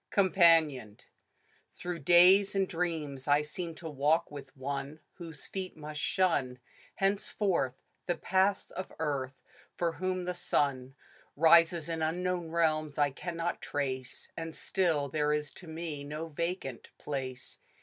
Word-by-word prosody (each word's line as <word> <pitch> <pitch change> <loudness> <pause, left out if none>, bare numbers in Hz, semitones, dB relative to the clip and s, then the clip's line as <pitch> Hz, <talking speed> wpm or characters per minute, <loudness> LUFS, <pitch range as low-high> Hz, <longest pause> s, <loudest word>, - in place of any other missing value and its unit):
COMPANIONED. 165 - +4 0.8
I^^^ji - - -12
HROUGH 175 -1 -3
days 180 +6 +6
and 195 -1 +2
dreams 160 -6 -3
I 145 +1 +4
seem 165 +2 -6
to 165 - -8
walk 150 +2 +1
with 140 -2 -10
one 140 +3 -4 0.2
Whose 165 -6 -9
feet 190 -3 -6
must 150 0 -6
shun 145 -10 +1 0.4
Henceforth, 195 - 0 0.3
the 175 - +1
paths 190 +1 +1
of 185 - -6
earth; 140 -4 -3 0.3
for 170 -1 0
whom 185 +3 -2
the 180 - -1
sun 135 -6 -1 0.4
Rises 165 +1 +5
in 165 -1 -3
unknown 175 +1 -1
realms 155 -3 +1
I 145 -1 +3
cannot 170 +4 -4
trace; 130 -3 -4
And 165 -1 -5
still 165 -7 0
there 150 +1 +1
is 150 -1 -2
to 180 - -12
me 160 -3 -5
no 155 +3 -5
vacant 170 -5 -4
place. 130 -3 -6
160 Hz, 140 wpm, -31 LUFS, 145-175 Hz, 0.8 s, days